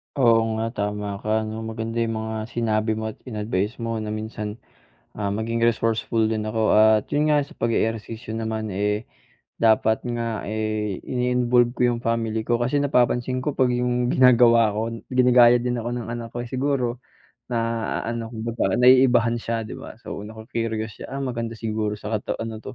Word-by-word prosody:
Oo 115 Hz, -4 st, +4 dB
nga 115 Hz, +1 st, -2 dB
tama 105 Hz, -2 st, -3 dB
ka 110 Hz, +1 st, 0 dB
'no, 110 Hz, +1 st, -5 dB
maganda 115 Hz, +1 st, -4 dB
yung 115 Hz, -1 st, 0 dB
mga 110 Hz, 0 st, -4 dB
sinabi 110 Hz, -2 st, 0 dB
mo 110 Hz, 0 st, -3 dB
at -, -, -19 dB
in-advice 105 Hz, -1 st, -2 dB
mo 115 Hz, -1 st, -2 dB
na 110 Hz, -, -5 dB
minsan, 110 Hz, -1 st, -5 dB, 0.6 s
ah, 100 Hz, -1 st, -2 dB
maging 110 Hz, +3 st, -2 dB
resourceful 115 Hz, -1 st, +1 dB
din 110 Hz, 0 st, -1 dB
ako. 110 Hz, 0 st, +1 dB
At 110 Hz, 0 st, +5 dB
yun 150 Hz, +1 st, +2 dB
nga 145 Hz, -1 st, +3 dB
sa -, -, -16 dB
pag-e-ehersisyo 115 Hz, 0 st, -2 dB
naman, 110 Hz, -2 st, -3 dB
eh, 105 Hz, +3 st, -1 dB, 0.5 s
dapat 110 Hz, +1 st, +3 dB
nga, 115 Hz, -2 st, -3 dB
eh, 110 Hz, -2 st, -2 dB
ini-involve 125 Hz, -1 st, +2 dB
ko -, -, -12 dB
'yong 120 Hz, -, -2 dB
family 115 Hz, -1 st, -1 dB
ko. 120 Hz, 0 st, +1 dB
Kasi 130 Hz, +4 st, +1 dB
napapansin 125 Hz, -2 st, +1 dB
ko 145 Hz, +1 st, -3 dB
'pag 125 Hz, -2 st, +3 dB
'yong 125 Hz, 0 st, 0 dB
ginagawa 120 Hz, -3 st, +5 dB
ko, 110 Hz, +2 st, -3 dB, 0.2 s
ginagaya 125 Hz, -1 st, +6 dB
din 120 Hz, -1 st, -2 dB
ako 120 Hz, -, -3 dB
ng 120 Hz, -1 st, -4 dB
anak 115 Hz, -1 st, -6 dB
ko, -, -, -6 dB
eh. 120 Hz, -, -4 dB
Siguro, 130 Hz, -1 st, -1 dB, 0.4 s
na 120 Hz, -2 st, -2 dB, 0.4 s
ano 115 Hz, 0 st, -3 dB, 0.6 s
naiibahan 125 Hz, -2 st, +5 dB
siya, 115 Hz, 0 st, -2 dB
'di 110 Hz, -, -8 dB
ba? -, -, -9 dB
So, 100 Hz, -, -6 dB
nacu-curious 110 Hz, 0 st, -4 dB
siya, -, -, -7 dB
ah, 140 Hz, -, -3 dB
maganda 115 Hz, -3 st, -3 dB
siguro 110 Hz, -2 st, -2 dB
sa 105 Hz, 0 st, -7 dB
kata -, -, -4 dB
ano 115 Hz, -1 st, -5 dB
'to, 130 Hz, +4 st, -9 dB
115 Hz, 175 wpm, -23 LUFS, 110-120 Hz, 0.6 s, ginagaya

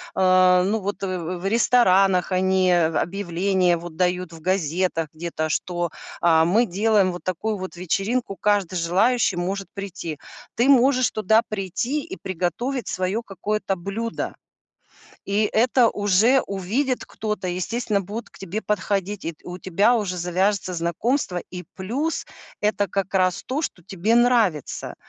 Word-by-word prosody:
э, 185 Hz, -1 st, +5 dB
ну 215 Hz, +3 st, 0 dB
вот, 200 Hz, 0 st, -4 dB
э, 185 Hz, -2 st, -2 dB
в 175 Hz, +1 st, -5 dB
в -, -, -7 dB
ресторанах 195 Hz, -6 st, +4 dB
они 185 Hz, 0 st, +2 dB
объявления 175 Hz, +2 st, +1 dB
вот 170 Hz, -1 st, -9 dB
дают, 180 Hz, -1 st, 0 dB
в 165 Hz, -, -10 dB
газетах 175 Hz, -2 st, 0 dB
где-то, 155 Hz, -1 st, -3 dB
что, 175 Hz, +1 st, -1 dB, 0.3 s
а, 160 Hz, -1 st, +5 dB
мы 215 Hz, +8 st, +3 dB
делаем 205 Hz, -1 st, +2 dB
вот 175 Hz, -, -8 dB
такую 185 Hz, +4 st, -2 dB
вот 185 Hz, -1 st, -7 dB
вечеринку, 195 Hz, +5 st, -1 dB
каждый 200 Hz, -4 st, +1 dB
желающий 195 Hz, +9 st, +2 dB
может 190 Hz, +3 st, -3 dB
прийти. 185 Hz, -6 st, -6 dB, 0.4 s
Ты 245 Hz, +4 st, +2 dB
можешь 255 Hz, -2 st, +4 dB
туда 220 Hz, +2 st, +3 dB
прийти 215 Hz, -, -2 dB
и 370 Hz, -, -7 dB
приготовить 190 Hz, -, -2 dB
свое 185 Hz, +5 st, -1 dB
какое-то 200 Hz, 0 st, -2 dB
блюдо. 200 Hz, +6 st, -4 dB, 0.9 s
И 205 Hz, +2 st, +1 dB
это 240 Hz, +1 st, +4 dB
уже 210 Hz, +7 st, +3 dB
увидит 225 Hz, +8 st, -2 dB
кто-то, 210 Hz, -4 st, -4 dB
и, 175 Hz, -, -2 dB
естественно, 210 Hz, +2 st, -1 dB
будут 210 Hz, +5 st, -6 dB
к -, -, -20 dB
тебе 195 Hz, +3 st, -4 dB
подходить, 205 Hz, -2 st, -2 dB
и 165 Hz, -, -2 dB
т 155 Hz, -, -27 dB
у 180 Hz, -, -5 dB
тебя 200 Hz, +6 st, +2 dB
уже 195 Hz, -6 st, -1 dB
завяжется 185 Hz, +2 st, 0 dB
знакомство, 180 Hz, -, -1 dB
и 180 Hz, 0 st, -7 dB
плюс 260 Hz, +12 st, -2 dB, 0.3 s
это 210 Hz, -1 st, +1 dB
как 195 Hz, 0 st, -3 dB
раз 185 Hz, -2 st, +2 dB
то, 285 Hz, +5 st, -2 dB
что 180 Hz, -, -5 dB
тебе 195 Hz, +5 st, 0 dB
нравится. 235 Hz, -, +2 dB
190 Hz, 150 wpm, -23 LUFS, 180-220 Hz, 0.9 s, э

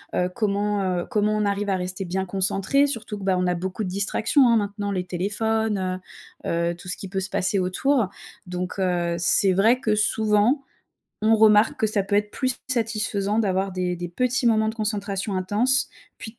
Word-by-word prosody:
Heu, 180 Hz, -, +1 dB
comment, 205 Hz, -1 st, 0 dB
heu, 180 Hz, -2 st, -1 dB
comment 210 Hz, 0 st, +1 dB
on 210 Hz, -, 0 dB
arrive 200 Hz, 0 st, -1 dB
à 195 Hz, -, +2 dB
rester 185 Hz, +1 st, -4 dB
bien 190 Hz, +1 st, -2 dB
concentré? 195 Hz, +8 st, +1 dB
Surtout 225 Hz, -6 st, -4 dB
que, -, -, -8 dB
bah, 190 Hz, -1 st, +2 dB
on 180 Hz, -, 0 dB
a 180 Hz, -, +1 dB
beaucoup 185 Hz, +4 st, -4 dB
de 185 Hz, -, -3 dB
distractions, 215 Hz, +8 st, +2 dB
hein, 230 Hz, -, +4 dB
maintenant 205 Hz, -1 st, -2 dB
les 185 Hz, -2 st, -1 dB
téléphones, 200 Hz, 0 st, -1 dB, 0.5 s
heu, -, -, -1 dB, 0.2 s
heu, -, -, -6 dB
tout 175 Hz, -, -13 dB
ce 180 Hz, -, -3 dB
qui 195 Hz, -, -7 dB
peut 195 Hz, +1 st, -2 dB
se 190 Hz, -, -2 dB
passer 195 Hz, +2 st, 0 dB
autour. 215 Hz, +6 st, +1 dB, 0.4 s
Donc, 180 Hz, +2 st, -4 dB
heu, 175 Hz, -2 st, 0 dB
c'est 185 Hz, +3 st, +3 dB
vrai 225 Hz, +7 st, +4 dB
que, 220 Hz, -4 st, 0 dB
souvent, 215 Hz, +5 st, +2 dB, 0.6 s
on 220 Hz, +1 st, +4 dB
remarque 215 Hz, +5 st, +5 dB
que 220 Hz, -, +3 dB
ça 210 Hz, -2 st, 0 dB
peut 200 Hz, +1 st, 0 dB
être 210 Hz, 0 st, 0 dB
plus 255 Hz, +1 st, -2 dB
satisfaisant 215 Hz, -3 st, -1 dB
d'avoir 195 Hz, -2 st, 0 dB
des 180 Hz, -1 st, -1 dB
des 175 Hz, 0 st, -5 dB
petits 250 Hz, +7 st, 0 dB
moments 220 Hz, -1 st, +3 dB
de -, -, -9 dB
concentration 205 Hz, -2 st, -2 dB
intense 215 Hz, +9 st, +2 dB, 0.3 s
puis 220 Hz, -, -8 dB
de 235 Hz, -, -35 dB
205 Hz, 200 wpm, -24 LUFS, 185-220 Hz, 0.6 s, remarque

